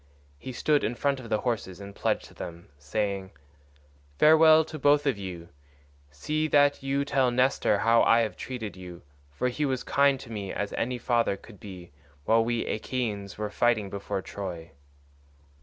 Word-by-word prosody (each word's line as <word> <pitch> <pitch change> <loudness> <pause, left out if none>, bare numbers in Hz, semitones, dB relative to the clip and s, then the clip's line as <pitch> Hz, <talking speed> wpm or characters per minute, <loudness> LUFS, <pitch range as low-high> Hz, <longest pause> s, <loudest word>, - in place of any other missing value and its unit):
He 130 - -7
stood 145 +4 +1
in 115 +3 -1
front 140 +1 0
of 120 -3 -10
the 110 - 0
horses 105 -7 -3
and 100 0 -9
pledged - - -2
them, 85 0 -8
saying, 100 +4 -3 0.8
"Farewell 160 0 +6
to 155 -1 -8
both 145 +1 +4
of 135 -4 +2
you; 90 -3 -7 0.6
see 155 - -2
that 145 -1 +3
you 135 +1 -1
tell 135 -3 +2
Nestor 125 -3 +2
how 115 +2 +4
I 115 +1 +5
have 110 -5 -2
treated 110 -7 -6
you, 90 -2 -10 0.3
for 70 - -1
he 125 +5 -3
was 130 -3 0
as - - -10
kind 140 -1 +4
to 115 - -11
me 100 -3 -5
as 105 - -3
any 125 +1 -2
father 120 -5 +1
could 105 -1 -15
be 90 -5 -10 0.3
while 115 0 +4
we 120 0 -1
Achaeans 105 -4 -3
were 105 -1 -3
fighting 110 -5 +1
before 100 -1 -4
Troy." 85 -5 -7
115 Hz, 175 wpm, -27 LUFS, 100-135 Hz, 0.8 s, Farewell